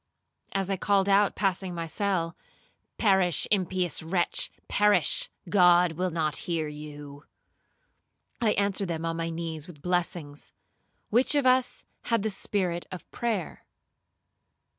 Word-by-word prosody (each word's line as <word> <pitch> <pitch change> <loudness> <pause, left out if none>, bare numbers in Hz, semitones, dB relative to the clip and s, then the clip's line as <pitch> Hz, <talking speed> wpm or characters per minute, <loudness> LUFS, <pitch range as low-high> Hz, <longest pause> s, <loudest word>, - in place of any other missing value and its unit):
As 195 0 0
they 195 0 -2
called 195 0 +2
out, 200 +1 +4
passing 190 -2 -1
my 170 -1 -3
cell, 175 -2 -1 0.6
'Perish, 190 -6 +3
impious 185 -3 0
wretch, 175 +2 0 0.2
perish,—God 205 - +3
will 180 +3 -1
not 160 -3 -1
hear 165 -2 0
you,' 145 -1 -9 1.2
I 220 -3 +3
answered 200 -1 0
them 165 -1 -3
on 165 0 -1
my 165 0 -2
knees 165 -2 -5
with 150 -5 -13
blessings,—which 180 - -2
of 285 -2 +2
us 255 0 +2 0.2
had 230 -4 +1
the 220 - -1
spirit 185 -3 -2
of 185 - -8
prayer? 220 -8 -3
180 Hz, 120 wpm, -27 LUFS, 165-200 Hz, 1.2 s, out